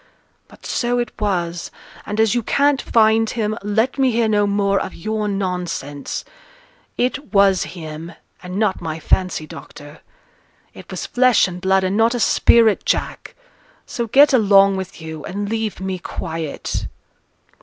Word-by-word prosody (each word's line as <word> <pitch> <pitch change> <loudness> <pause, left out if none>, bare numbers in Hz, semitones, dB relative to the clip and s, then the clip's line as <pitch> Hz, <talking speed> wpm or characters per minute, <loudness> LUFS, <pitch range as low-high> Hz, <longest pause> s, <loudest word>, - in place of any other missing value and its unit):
But - - -17
so 245 0 -1
it 240 -2 -2
was; 175 -4 -2 0.4
and 210 +1 -3
as 220 -1 +3
you 240 - +1
can't 280 +4 +2
find 225 0 +3
him, 215 -2 -2
let 220 +7 0
me 265 -1 +4
hear 230 -1 +1
no 205 -1 +2
more 200 -1 +1
of 190 - -5
your 215 +4 -3
nonsense. 180 -7 -4 0.7
It 260 +3 -2
was 195 -3 +4
him, 160 +1 -8 0.3
and 180 +1 -6
not 210 -3 0
my 160 -1 -4
fancy, 180 -1 0
doctor. 145 0 -12 0.7
It - - -13
was - - -5
flesh 250 -4 +3
and 180 -1 -8
blood, 190 0 +2
and 185 +2 0
not 230 +2 +3
a - - -2
spirit, 225 -1 +4
Jack. - - -2 0.5
So 235 -1 -4
get 280 +5 +5
along 200 -4 +5
with 190 -2 -6
you, 160 -2 -7
and 205 +2 -4
leave 220 -1 -3
me 190 -1 -4
quiet.' 160 -3 -5
200 Hz, 155 wpm, -20 LUFS, 180-225 Hz, 0.7 s, get